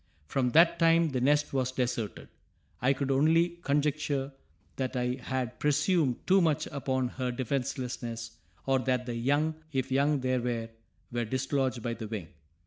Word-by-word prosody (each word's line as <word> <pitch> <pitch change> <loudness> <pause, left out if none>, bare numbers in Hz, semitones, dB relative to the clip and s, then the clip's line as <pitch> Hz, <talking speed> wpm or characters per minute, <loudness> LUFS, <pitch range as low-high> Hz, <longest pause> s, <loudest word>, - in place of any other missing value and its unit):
From 125 - 0
that 170 +1 +6
time 165 -1 +4
the 130 -3 -2
nest 145 +3 +2
was 130 -1 0
deserted; 120 -4 -3 0.5
I 130 +3 +4
could 140 0 -1
only 165 +5 +3
conjecture 145 -1 0 0.4
that 130 -1 -2
I 125 +1 -1
had 125 -2 -3
presumed 150 -2 +1
too 190 +1 +5
much 160 -4 +2
upon 130 -3 -1
her 125 0 -3
defenselessness, 120 -3 -3 0.3
or, 135 -1 +2
that 125 0 0
the 120 - -3
young, 145 +7 +1 0.2
if 135 -1 -2
young 140 +1 +2
there 130 -1 +1
were, 115 -2 -2 0.4
were 120 -1 -1
dislodged 130 0 -1
by 120 - -1
the 115 -1 -6
wind. 105 -7 -5
130 Hz, 155 wpm, -29 LUFS, 125-145 Hz, 0.5 s, that